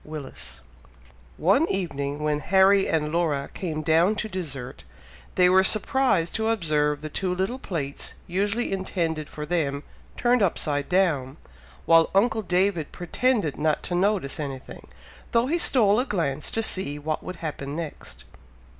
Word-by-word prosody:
Willis. 135 Hz, -, -9 dB, 0.8 s
One 200 Hz, -, +3 dB
evening, 145 Hz, -6 st, -3 dB
when 150 Hz, -1 st, 0 dB
Harry 195 Hz, +3 st, +4 dB
and 150 Hz, -1 st, 0 dB
Laura 155 Hz, -5 st, -1 dB
came 155 Hz, -4 st, -4 dB
down 165 Hz, +6 st, +3 dB
to 215 Hz, -, -3 dB
dessert, 150 Hz, -11 st, -6 dB, 0.5 s
they 180 Hz, -1 st, +5 dB
were 190 Hz, +1 st, +5 dB
surprised 215 Hz, -4 st, +3 dB
to 220 Hz, 0 st, 0 dB
observe 150 Hz, -8 st, 0 dB
the 155 Hz, -, -5 dB
two 180 Hz, +3 st, -2 dB
little 195 Hz, +8 st, -2 dB
plates 145 Hz, -, -4 dB
usually 205 Hz, +6 st, -1 dB
intended 170 Hz, -5 st, -2 dB
for 150 Hz, -, -6 dB
them, 145 Hz, -4 st, -1 dB, 0.3 s
turned 245 Hz, -1 st, +2 dB
upside 150 Hz, -6 st, 0 dB
down, 160 Hz, -8 st, +1 dB, 0.5 s
while 165 Hz, -1 st, +5 dB
uncle 220 Hz, +2 st, +3 dB
David 180 Hz, -4 st, 0 dB
pretended 195 Hz, -, -1 dB
not 155 Hz, 0 st, 0 dB
to -, -, -4 dB
notice 185 Hz, -6 st, 0 dB
anything, 135 Hz, -3 st, -7 dB, 0.5 s
though 230 Hz, 0 st, +3 dB
he 330 Hz, +6 st, 0 dB
stole 220 Hz, -9 st, +4 dB
a 255 Hz, -, +1 dB
glance 155 Hz, -, -1 dB
to 225 Hz, -, -1 dB
see 185 Hz, -9 st, -2 dB
what 155 Hz, +1 st, -3 dB
would 185 Hz, -, -7 dB
happen 145 Hz, -4 st, -5 dB
next. 165 Hz, -2 st, -7 dB
170 Hz, 145 wpm, -25 LUFS, 150-195 Hz, 0.8 s, they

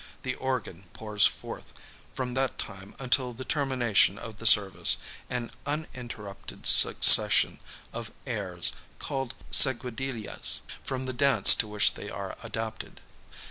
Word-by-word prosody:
The 125 Hz, -, -4 dB
organ 125 Hz, -9 st, -7 dB
pours 105 Hz, -2 st, 0 dB
forth, -, -, -11 dB, 0.4 s
from 125 Hz, -2 st, -6 dB
that 130 Hz, 0 st, -3 dB
time 95 Hz, +1 st, -6 dB
until 130 Hz, -1 st, -1 dB
the 130 Hz, +3 st, -11 dB
termination 125 Hz, -9 st, -1 dB
of 110 Hz, -3 st, -11 dB
the 115 Hz, -, -2 dB
service, 100 Hz, -4 st, +4 dB, 0.3 s
an 125 Hz, -2 st, -6 dB, 0.2 s
uninterrupted 125 Hz, -9 st, -9 dB
succession -, -, +6 dB, 0.3 s
of 115 Hz, -1 st, -8 dB, 0.2 s
airs, 100 Hz, -8 st, -1 dB, 0.3 s
called 135 Hz, -3 st, -7 dB, 0.2 s
seguidillas, 125 Hz, -3 st, +1 dB, 0.2 s
from 130 Hz, 0 st, -7 dB
the 130 Hz, -, -4 dB
dance 140 Hz, +2 st, +6 dB
to 110 Hz, -, -2 dB
which 105 Hz, 0 st, +1 dB
they -, -, -10 dB
are -, -, -9 dB
adapted. 110 Hz, 0 st, -9 dB
120 Hz, 125 wpm, -25 LUFS, 105-130 Hz, 0.4 s, succession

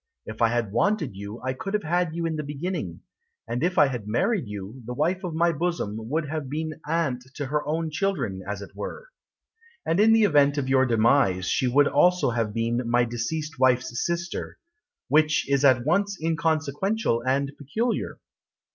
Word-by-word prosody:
If 110 Hz, +2 st, -8 dB
I 115 Hz, -, +6 dB
had 115 Hz, -3 st, -1 dB
wanted 190 Hz, -, 0 dB
you 100 Hz, +3 st, -7 dB
I 130 Hz, 0 st, -1 dB
could 195 Hz, +10 st, -4 dB
have 210 Hz, -, -1 dB
had 170 Hz, 0 st, 0 dB
you 170 Hz, 0 st, -2 dB
in 165 Hz, -1 st, -1 dB
the 155 Hz, -, -2 dB
beginning. 150 Hz, +6 st, -4 dB, 0.5 s
And 120 Hz, -, -2 dB
if 180 Hz, +3 st, 0 dB
I -, -, +7 dB
had 125 Hz, -6 st, -4 dB
married 185 Hz, -, 0 dB
you 105 Hz, +4 st, -7 dB
The 125 Hz, -, -4 dB
wife 175 Hz, +7 st, 0 dB
of 175 Hz, -3 st, -4 dB
my 170 Hz, +1 st, +3 dB
bosom 140 Hz, -10 st, -3 dB
Would 155 Hz, +1 st, -1 dB
have 145 Hz, -2 st, -4 dB
been 155 Hz, +2 st, -4 dB
aunt 150 Hz, -6 st, 0 dB
to 145 Hz, -, -3 dB
her 150 Hz, +2 st, -1 dB
own 160 Hz, +1 st, -1 dB
children, 150 Hz, -, -1 dB
as 100 Hz, -1 st, -4 dB
it -, -, -11 dB
were. -, -, -7 dB, 0.8 s
And 165 Hz, +3 st, +1 dB
in 220 Hz, +2 st, +6 dB
the 225 Hz, 0 st, +5 dB
event 145 Hz, -6 st, +4 dB
of 135 Hz, -2 st, -1 dB
your 130 Hz, 0 st, +3 dB
demise 115 Hz, -5 st, +3 dB
She 130 Hz, -, +1 dB
would 140 Hz, +3 st, +4 dB
also 180 Hz, -7 st, +3 dB
have 115 Hz, -2 st, -1 dB
been 115 Hz, +2 st, -1 dB
My 120 Hz, 0 st, +3 dB
deceased 140 Hz, +6 st, -4 dB
wife's 130 Hz, -1 st, +2 dB
sister 170 Hz, 0 st, -3 dB, 0.5 s
Which 155 Hz, +2 st, +3 dB
is 140 Hz, 0 st, +1 dB
at 130 Hz, -3 st, +4 dB
once 200 Hz, +5 st, +1 dB
inconsequential 160 Hz, -, 0 dB
and 135 Hz, +2 st, 0 dB
peculiar. 220 Hz, -, -2 dB
145 Hz, 185 wpm, -25 LUFS, 120-170 Hz, 0.8 s, I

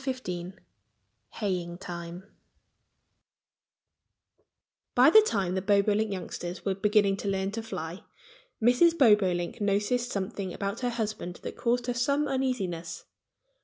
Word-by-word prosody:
XV 185 Hz, -10 st, -4 dB, 0.8 s
HAYING 180 Hz, -5 st, -3 dB
TIME 175 Hz, -1 st, -7 dB, 2.7 s
BY -, -, +7 dB
the 435 Hz, -, +9 dB
time 195 Hz, -, -1 dB
the 190 Hz, -, -1 dB
Bobolink 205 Hz, +2 st, +2 dB
youngsters 180 Hz, -1 st, -6 dB
were 195 Hz, -, +1 dB
beginning 205 Hz, 0 st, +2 dB
to 200 Hz, -, -5 dB
learn 195 Hz, 0 st, -1 dB
to 225 Hz, +2 st, -4 dB
fly 170 Hz, -5 st, -6 dB, 0.6 s
Mrs. 250 Hz, +9 st, +4 dB
Bobolink 200 Hz, -, +3 dB
noticed 205 Hz, +5 st, +1 dB
something 195 Hz, -2 st, -4 dB
about 200 Hz, +3 st, -3 dB
her 245 Hz, -, -1 dB
husband 215 Hz, -6 st, -4 dB
that -, -, -6 dB
caused 245 Hz, +1 st, 0 dB
her 245 Hz, -, -1 dB
some 280 Hz, +5 st, +1 dB
uneasiness. 195 Hz, -12 st, -2 dB
200 Hz, 120 wpm, -28 LUFS, 185-240 Hz, 2.7 s, the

